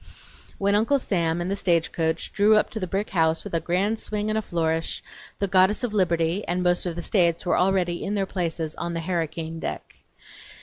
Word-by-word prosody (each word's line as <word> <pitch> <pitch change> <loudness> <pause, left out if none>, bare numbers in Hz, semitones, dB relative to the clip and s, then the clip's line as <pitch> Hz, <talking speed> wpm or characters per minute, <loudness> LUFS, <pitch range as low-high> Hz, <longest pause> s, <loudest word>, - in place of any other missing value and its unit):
When 200 0 +1
Uncle 225 +7 +3
Sam 170 -8 0
and 180 +2 -2
the - - +1
stagecoach 165 -3 0
drew 210 +1 +5
up 215 - +2
to 220 - -4
the 185 - -3
brick 195 +4 -2
house 160 -2 +2
with - - -8
a 165 - +2
grand 190 +7 0
swing 210 0 -2
and 215 - 0
a - - -2
flourish, 165 -4 -1 0.3
the 200 - 0
goddess 190 +4 +3
of 235 -4 -1
Liberty 170 -1 +1
and 180 +1 0
most 175 0 +2
of 170 - -3
the 170 - -5
States 170 -3 +2
were 175 - +2
already 180 -2 +1
in 205 - -2
their 195 -1 +1
places 165 -4 -3
on 170 0 -3
the - - -1
"harricane 165 -1 -3
deck." - - -6
180 Hz, 210 wpm, -25 LUFS, 165-200 Hz, 0.3 s, drew